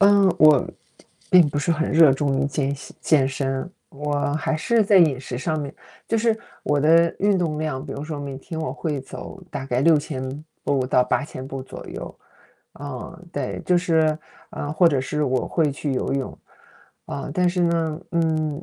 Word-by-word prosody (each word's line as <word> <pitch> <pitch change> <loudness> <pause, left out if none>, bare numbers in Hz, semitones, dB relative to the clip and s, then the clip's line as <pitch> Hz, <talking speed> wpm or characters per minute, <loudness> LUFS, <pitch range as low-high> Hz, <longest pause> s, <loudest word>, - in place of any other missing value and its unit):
嗯， 200 -2 +5
我， 155 -3 +6 0.6
并 180 -3 +7
不 145 - -2
是 145 +4 0
很 160 0 0
热 160 -2 +7
衷 135 0 +1
于 140 - +1
健 140 0 -1
隙 140 - -12
健 140 -4 +3
身， 135 +3 -3 0.2
我 145 0 -2
还 160 +1 -1
是 230 +8 +2
在 205 0 +4
饮 155 -8 +5
食 130 -2 -6
上 155 +4 -2
面 140 -1 -6 0.3
就 225 - +1
是 225 0 +1 0.2
我 145 -1 +1
的 165 +3 +4
运 205 0 +3
动 165 -4 -1
量 150 -3 -3
比 - - -6
如 140 - -6
说 150 -1 -5
每 140 -2 -6
天 160 +4 -7
我 160 - -2
会 150 -4 -3
走 180 +7 -9
大 135 - -5
概 125 -1 0
6000 145 -2 +1 0.2
步 135 -2 +1
到 125 -1 +3
8000 130 0 -2
步 135 -1 -6
左 130 - -10
右， - - -8 0.6
啊， 145 +3 -7
对。 - - -4
就 180 - +4
是， 160 -3 +2 0.3
啊， 145 - -5
或 170 +2 +5
者 140 -5 0
是 150 +3 -2
我 130 -3 0
会 160 -4 +1
去 140 0 -3
游 130 - -1
泳， 135 -2 -4 0.7
啊， - - -5
但 180 +1 +2
是 180 +1 -1
呢， 165 -2 0
嗯， 160 -2 0
150 Hz, 195 characters per minute, -23 LUFS, 135-165 Hz, 0.7 s, 并